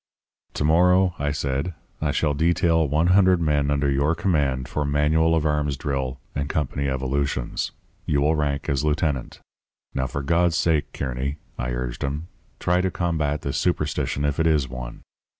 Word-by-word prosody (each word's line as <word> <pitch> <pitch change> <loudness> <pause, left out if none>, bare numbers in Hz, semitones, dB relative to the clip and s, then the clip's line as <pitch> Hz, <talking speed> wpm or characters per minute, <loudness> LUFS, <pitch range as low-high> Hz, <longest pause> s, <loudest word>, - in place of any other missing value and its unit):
"'To - - -1
morrow,' 90 +4 +4
I 75 0 0
said, 70 +3 -2 0.3
'I 75 - +1
shall 75 -1 +1
detail 80 +1 +2
one 75 +5 +2
hundred 95 -2 +5
men 75 -3 +1
under 70 0 +1
your 70 +4 +2
command 75 -8 0
for 75 - -2
manual 75 +3 +2
of 80 -1 0
arms 75 -2 0
drill 65 -2 -3
and 70 0 -2
company 70 -2 -1
evolutions. 65 -1 -1 0.4
You 70 -1 +2
will 75 +2 +3
rank 70 -2 -1
as 70 0 0
lieutenant. 75 -3 -1 0.5
Now, 65 -1 -1
for 70 +3 -4
God's 85 +2 +2
sake, 80 -3 +1
Kearny,' 70 +2 -3 0.2
I 60 - -3
urged - - -3
him, 75 +5 -3 0.3
'try 90 +1 +2
to 95 - +1
combat 80 -5 -1
this 70 - -1
superstition 75 -4 0
if 75 0 -1
it 80 - +3
is 75 -4 +2
one. - - -8
75 Hz, 170 wpm, -24 LUFS, 70-80 Hz, 0.5 s, hundred